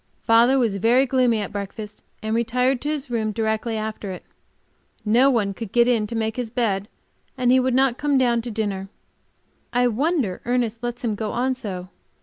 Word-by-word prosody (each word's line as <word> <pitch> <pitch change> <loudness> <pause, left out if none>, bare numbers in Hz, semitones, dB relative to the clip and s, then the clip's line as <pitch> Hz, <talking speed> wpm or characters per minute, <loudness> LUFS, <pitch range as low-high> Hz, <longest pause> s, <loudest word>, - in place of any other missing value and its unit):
Father 235 +3 +5
was 225 -6 +1
very 240 +6 +4
gloomy 250 -4 +2
at 200 - -5
breakfast, 205 +1 -6 0.2
and 220 0 -1
retired 250 +2 +1
to 295 - -2
his 295 -4 -3
room 220 -2 0
directly 220 +1 -1
after 215 -1 -4
it. 185 - -7 0.8
No 240 +6 +5
one 210 -6 +1
could 215 0 -7
get 240 0 +4
in 230 -4 +2
to 230 - -5
make 220 0 -2
his 245 -3 -3
bed, 215 -5 -1 0.5
and 250 -1 +2
he 260 - +6
would 255 -1 +1
not 260 -2 +2
come 290 -2 +2
down 240 -2 +2
to 240 - -6
dinner. 205 -3 -3 0.8
I 245 +1 +3
wonder 260 - 0
Ernest 235 -2 -1
lets 240 0 -4
him 225 -3 0
go 210 0 -3
on 255 +2 +1
so. 190 -8 -6
235 Hz, 190 wpm, -23 LUFS, 215-250 Hz, 0.8 s, he